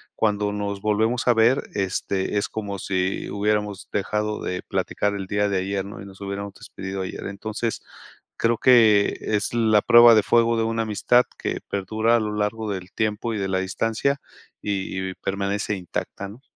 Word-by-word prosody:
cuando 105 -1 +1
nos 100 -1 -3
volvemos 110 +4 +1
a 120 - +6
ver, 115 +4 +4
este, 95 0 -1
es 100 - -1
como 100 -2 -4
si 95 0 -1
hubiéramos 105 -1 -1
dejado 105 +1 -1
de 90 - -3
platicar 105 0 -1
el 95 -2 -5
día 105 +1 +1
de 100 - 0
ayer, 95 +1 -2
¿no?, 100 0 -9
y - - -9
nos 95 -1 -13
hubiéramos 100 0 -5
despedido 95 0 -6
ayer. 95 - -6
Entonces, 110 +3 -4 0.6
creo 115 0 +2
que 110 -5 +5
es 105 0 -1
la 110 -3 +4
prueba 120 -1 +8
de 110 - +4
fuego 115 -1 +3
de 115 - +1
una 115 0 0
amistad 115 +3 +3
que - - -3
perdura 110 +4 +1
a - - +3
lo 105 -1 -2
largo 105 +1 -1
del 95 -1 -6
tiempo 110 +1 -1
y 110 - -2
de 95 -1 -1
la 95 - +1
distancia, 115 +8 -1 0.4
y 95 -2 -2
y - - -8
permanece 100 +2 -2
intacta, 95 +1 -5
¿no? 110 +6 -13
105 Hz, 180 wpm, -24 LUFS, 100-110 Hz, 0.6 s, prueba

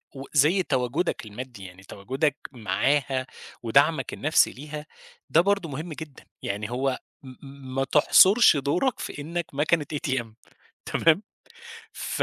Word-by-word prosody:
وزي 150 +7 +2
تواجُدك 130 +1 -1
المادي، 110 -1 -9
يعني 90 +1 -12
تواجُدك 135 +10 -2
معاها 130 +2 0 0.4
ودَعمك 140 +7 +2
النفْسي 155 +3 +3
ليها، 150 +2 -8 0.4
ده 165 - +5
برضه 200 -2 0
مهم 155 +4 -6
جدًا. 150 -2 -10 0.2
يعني 105 +2 -3
هو 130 +1 -1 0.2
م 130 - -10 0.2
م 135 -1 -10
ما 135 - +1
تحصُرش 185 - +6
دورَك 145 - 0
في 145 - -6
إنّك 170 +3 -3
مكنة 150 +2 +1
ATM 135 -5 -2 0.6
تمام، 165 +5 +2 0.7
ف - - -2
140 Hz, 130 wpm, -25 LUFS, 130-155 Hz, 0.7 s, تحصُرش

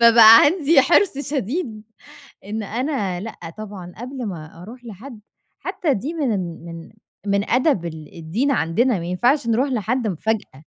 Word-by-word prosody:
فبقى 230 -1 +9
عندي 305 -1 +4
حرص 320 +2 +3
شديد 275 - -3 0.6
إن 215 +2 -4
أنا 215 - -2
لأ 225 +3 -7 0.2
طبعًا 195 -4 -8
قبل 250 +1 -6
ما 165 -3 -8
أروح 245 +5 -12
لحد 230 +2 -10 0.4
حتى 370 -6 -1
دي 275 - -4
من 285 -8 0
ال 170 -4 -5
من 165 -1 -9 0.4
من 200 +1 0
أدب 250 - +2
ال 155 -3 -8
الدِّين 190 - -1
عندنا، 230 +1 +1
ما 170 - -6
ينفعش 240 - +1
نروح 235 +5 +1
لحد 245 0 -1
مفاجأة. 195 -6 -3
225 Hz, 150 wpm, -21 LUFS, 185-270 Hz, 0.6 s, فبقى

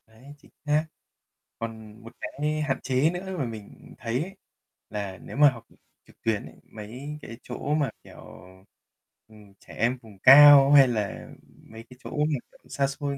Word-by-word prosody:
Đấy, 120 +6 -16
chính - - -23
xác. 150 +1 +1 0.7
Còn 110 -1 -8
một 115 - -12
cái 150 +1 -3
hạn 135 -3 -1
chế 130 +4 +2
nữa 185 +1 -6
mà 140 - -1
mình 110 -3 -11
thấy 120 +3 -2
ấy 190 +4 -7 0.5
là 100 -3 -6
nếu - - -9
mà 145 0 +7
học 115 -3 -12 0.4
trực - - -23
tuyến 110 -3 -1
ấy, - - -14
mấy 125 +8 -9
cái 115 - -10
chỗ 145 - -4
mà, 145 -3 0
kiểu, - - -15 1.1
ừm, 105 -2 -18
trẻ - - -15
em 120 +3 0
vùng 105 -4 -16
cao 140 +3 +9
hay 140 -2 +8
là 105 -5 -4 0.4
mấy 110 0 -11
cái 125 - -15
chỗ - - -8
mà 150 -2 0
tận - - -24
xa 140 -1 0
xôi 140 0 -4
130 Hz, 180 wpm, -26 LUFS, 110-145 Hz, 1.1 s, cao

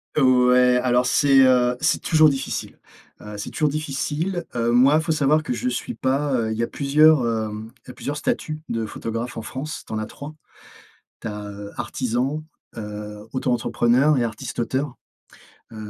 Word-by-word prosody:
Ouais, 125 -2 +5
alors 125 0 +2
c'est, 135 +1 +4
heu, 125 -1 +3
c'est - - +1
toujours 155 -2 +5
difficile, 135 -1 -4 0.4
heu, 105 0 -8
c'est 105 - -6
toujours 150 -1 +1
difficile. 155 +4 -3
Heu, 120 0 +1
moi, 130 +5 +5
il 160 - +3
faut 160 - -1
savoir 155 0 +2
que 125 - -2
je 120 +2 -2
suis 125 - -4
pas, 135 +4 0
heu, 115 -3 0
il 110 - -3
y 115 - 0
a - - 0
plusieurs, 150 +2 +4
hem, 110 -1 -3 0.2
il - - -14
y - - -5
a - - -13
plusieurs 145 +1 -5
statuts 155 +1 -2
de 115 -1 -2
photographe 115 +2 -5
en 115 - -4
France, 135 +7 -6
tu - - -8
en 110 - -1
as 110 - -4
3. 145 +6 -9 0.9
Tu - - -9
as, 105 -1 -5
heu, 100 0 -8
artisan, 125 +5 -2 0.3
heu, 105 0 -7
auto-entrepreneur 125 +2 +2
et - - +1
artiste-auteur. 125 +3 -3 0.8
Heu, - - -11
125 Hz, 180 wpm, -23 LUFS, 115-145 Hz, 0.9 s, Ouais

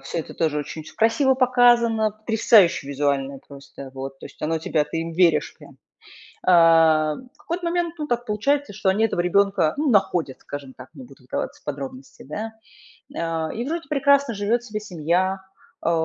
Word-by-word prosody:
всё 135 +4 -5
это 160 - -6
тоже 155 -2 0
очень 150 +2 -6
всё 155 - -14
красиво 230 +5 +3
показано, 240 -4 +3
потрясающе 215 - +3
визуально 140 -1 -1
просто, 140 -1 -12
вот. 135 0 -7
То - - -9
есть - - -17
оно 160 +1 0
тебя 150 -1 0
ты 150 - -6
им 165 0 -3
веришь 170 -1 +2
прям. - - -16 0.7
Э, 165 -3 +5
в 260 +4 -21
какой-то 340 +4 -5
момент, 345 -1 -1
ну, 300 - -3
так 240 -3 -2
получается, 275 +4 0
что 190 -1 0
они 210 +4 +2
этого 175 -5 -1
ребёнка, 195 -2 +2
ну, 295 0 +1
находят, 180 - +1
скажем 140 -2 -8
так, 130 0 -12
не 135 -5 -11
буду 130 +1 -17
вдаваться 125 - -5
в - - -34
подробности, 135 -2 -7
да, 215 +10 -6 0.6
а. 165 -1 -2
И 235 - -3
вроде 330 0 -4
прекрасно 280 -3 +2
живёт 210 +4 0
себе 215 -3 -5
семья, 185 0 -1 0.4
а, 170 - +1
185 Hz, 180 wpm, -23 LUFS, 150-235 Hz, 0.7 s, Э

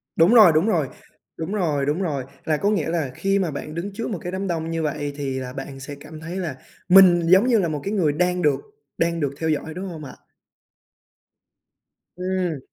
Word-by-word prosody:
Đúng 165 +7 +5
rồi, 215 -7 +9
đúng 160 +7 +3
rồi. 165 -10 +1 0.5
Đúng 165 +5 -4
rồi, 155 -9 0
đúng 150 +6 0
rồi. 145 -8 -2 0.2
Là 155 -1 +1
có 200 - +1
nghĩa 185 -7 0
là 160 -6 -1
khi 195 0 +1
mà 175 -4 -1
bạn 150 +2 -6
đứng 190 +4 -4
trước 230 +3 -4
một 200 -7 -3
cái 180 - -5
đám 190 +1 -3
đông 165 -2 -2
như 165 -1 -2
vậy 145 -1 -2
thì 135 -2 -3
là 125 -1 -6
bạn 135 0 -7
sẽ 140 +2 -7
cảm 155 +1 -11
thấy 165 +3 -7
là 170 -8 -3 0.3
mình 180 -2 +8
giống 190 +7 +6
như 235 -3 +4
là 175 - +1
một 150 -3 -3
cái 200 - -3
người 160 -8 +2
đang 180 +2 0
được 150 -4 +2 0.4
đang 170 0 0
được 140 -3 -1
theo 160 -1 -1
dõi, 155 +1 -2
đúng 185 +3 -6
hông 160 -3 -8
ạ? 130 - -9 2.0
Ừm. 180 -4 -2
165 Hz, 220 wpm, -23 LUFS, 150-185 Hz, 2.0 s, rồi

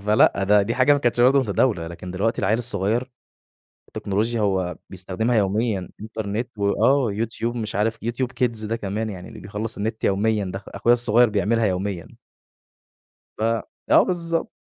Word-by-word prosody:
فلأ 105 -2 +4
ده 105 0 +5
دي 115 +4 -2
حاجة 130 +3 +4
ما 145 - +3
كانتش 120 -2 +1
برضه 135 +3 +6
متداولة، 100 -5 +1
لكن 85 +2 -8
دلوقتي 100 +5 -1
العيّل 110 +2 +2
الصغير 120 +2 0 0.8
التكنولوجيا 110 +4 -1
هو 95 -3 0
بيستخدمها 95 +6 -1
يوميًا 100 -1 0
Internet 110 +1 -3
وآه 115 +5 +2
YouTube 115 +2 -3
مش 110 -2 -4
عارف 110 +2 0
YouTube 120 +2 -1 0.2
Kids 115 -3 -2
ده 115 +2 -1
كمان 110 +1 -3
يعني 90 -2 -8
اللي - - -11
بيخلّص 105 +3 -5
النت 110 +2 -3
يوميًا 105 +1 +1
ده، 95 +1 -5
أخ 100 - -17
أخويا 115 +4 +2
الصغير 120 0 +4
بيعملها 110 +2 +1
يوميًا. 95 -2 -2 1.3
ف - - -4 0.5
آه - - +7
بالضبط، 170 -2 -2
110 Hz, 160 wpm, -23 LUFS, 100-120 Hz, 1.3 s, آه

